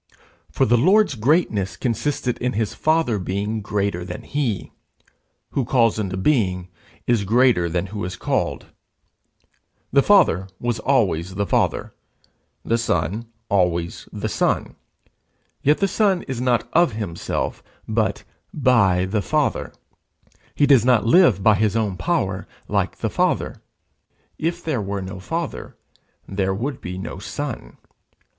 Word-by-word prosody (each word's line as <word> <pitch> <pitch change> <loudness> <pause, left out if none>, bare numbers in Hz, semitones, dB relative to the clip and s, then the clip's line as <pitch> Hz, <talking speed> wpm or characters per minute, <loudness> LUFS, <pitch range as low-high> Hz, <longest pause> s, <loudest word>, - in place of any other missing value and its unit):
For - - +2
the 120 +1 +3
Lord's 195 - +4
greatness 115 - +1
consisted 125 0 -1
in 125 0 -1
his 110 0 -1
Father 155 -9 +1
being 100 +4 -2
greater 100 -3 -1
than 90 0 -7
he: 130 -9 -2 0.8
who 135 - 0
calls 115 -3 +2
into 95 -3 -2
being 95 -6 +1 0.4
is 120 -4 +2
greater 110 -5 +3
than 85 +2 -1
who 105 - -4
is 90 +1 -4
called. - - -2 1.3
The 140 - +5
Father 170 - +4
was 120 -2 -1
always 95 - +1
the 100 - 0
Father, - - 0 0.7
the 115 +1 +1
Son 105 +1 -1 0.2
always 85 -3 0
the - - -3
Son; - - 0 0.9
yet 150 +2 +3
the 195 - +1
Son 195 -3 +1
is 130 -3 -4
not 125 -2 +1
of 170 -6 +4
himself, 100 -6 -3 0.3
but 110 -2 0 0.3
by 110 -10 +3
the 100 +2 -1
Father; 85 - 0 0.8
he 145 - +4
does 135 -6 +5
not 125 -3 +3
live 120 - +5
by 110 - +6
his 105 +1 +1
own 105 -4 0
power, 95 - -1 0.2
like - - -1
the - - -2
Father. - - 0 0.8
If 170 +2 -2
there 145 -8 -1
were 100 -1 -3
no 95 0 -7
Father, 165 - -5 0.5
there 95 -1 -1
would 125 +6 -4
be 90 +1 -6
no 95 - -6
Son. 115 - -6
110 Hz, 135 wpm, -22 LUFS, 95-130 Hz, 1.3 s, by